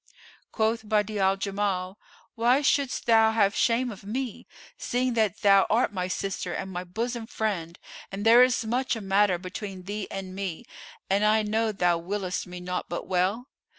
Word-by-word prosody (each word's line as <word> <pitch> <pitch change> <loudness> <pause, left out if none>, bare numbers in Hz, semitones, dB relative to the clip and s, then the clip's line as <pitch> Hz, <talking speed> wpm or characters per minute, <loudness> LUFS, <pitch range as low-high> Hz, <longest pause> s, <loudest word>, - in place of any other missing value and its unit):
Quoth 220 +1 0
Badi'a 210 -1 0
al 190 0 +3
Jamal, 195 -1 -2 0.3
"Why 245 +5 +2
shouldst 280 -2 +1
thou 225 -1 +5
have 205 -2 +2
shame 240 +1 +1
of 200 - -11
me, 240 +3 -5 0.3
seeing 250 0 -1
that 220 -4 0
thou 195 -2 +5
art 225 0 +2
my 180 -2 -2
sister 195 +1 -3
and 190 - -4
my 180 0 -4
bosom 230 +5 -4
friend 185 -8 -3 0.3
and 200 +2 -5
there 230 +2 +8
is 250 -2 +3
muchel 250 +2 0
a - - -6
matter 195 -1 +3
between 185 +1 -7
thee 205 +1 -4
and 190 -1 -6
me 190 -4 -5 0.4
and 200 +2 +1
I 215 +1 +4
know 220 +1 0
thou 175 -4 +1
willest 185 +1 -3
me 180 0 -8
naught 180 0 -4
but 175 - -4
well? 190 +6 0
205 Hz, 175 wpm, -26 LUFS, 190-225 Hz, 0.4 s, there